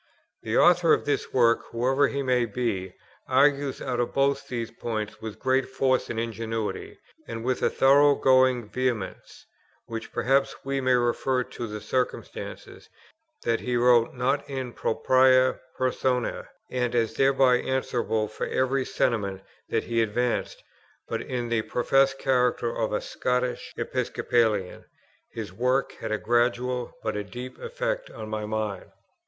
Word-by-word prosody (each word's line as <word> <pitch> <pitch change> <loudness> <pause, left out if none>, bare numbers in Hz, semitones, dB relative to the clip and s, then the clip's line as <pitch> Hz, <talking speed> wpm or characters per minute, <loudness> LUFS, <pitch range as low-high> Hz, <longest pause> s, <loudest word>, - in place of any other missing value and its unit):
The 110 +1 -1
author 175 -2 +5
of - - +1
this 145 - -1
work, 115 -2 +4
whoever 130 +4 +2
he 140 0 -2
may 125 -2 +2
be, 105 -5 -3 0.3
argues 140 +1 +2
out 125 -2 -2 0.2
both 140 0 +1
these 115 -2 -4
points 110 -2 -5
with 110 -2 -6
great 130 0 +1
force 130 -1 +1
and 115 - -2
ingenuity, 115 -1 -4 0.3
and 115 0 -6
with 130 0 0
a - - +3
thorough 140 +2 +5
going 130 -4 +3
vehemence, 120 -4 -3 0.4
which 115 -1 -6
perhaps 135 +2 +1
we 135 0 -1
may 130 0 +3
refer 125 +1 +1
to 120 -1 -7
the 105 0 -6
circumstance, 125 +4 -4 0.5
that 115 -1 +1
he 125 -1 -1
wrote, 120 0 +4
not 135 +3 0
in 130 -3 -4
propriâ 130 +3 +3 0.2
personâ, 130 -1 -1 0.2
and 125 -1 -1
as 115 -2 +1
thereby 135 -2 +4
answerable 120 -4 -1
for 110 - -5
every 130 +1 +1
sentiment 100 -7 -1 0.3
that - - 0
he 115 -1 0
advanced, 115 +2 -1 0.4
but - - -3
in 125 -2 -3
the 115 -1 +1
professed 135 +4 +2
character 125 -3 +1
of 110 - -1
a 105 - -1
Scotch 125 0 -2
Episcopalian. 110 -6 0 0.5
His 105 -5 -6
work 125 +6 +1
had 110 - -4
a 110 - +1
gradual, 120 +2 0
but 110 -1 -2
a 105 - -2
deep 125 +5 -8
effect - - -3
on 110 - -8
my 110 -1 -3
mind. 110 -2 -3
125 Hz, 145 wpm, -26 LUFS, 115-130 Hz, 0.5 s, author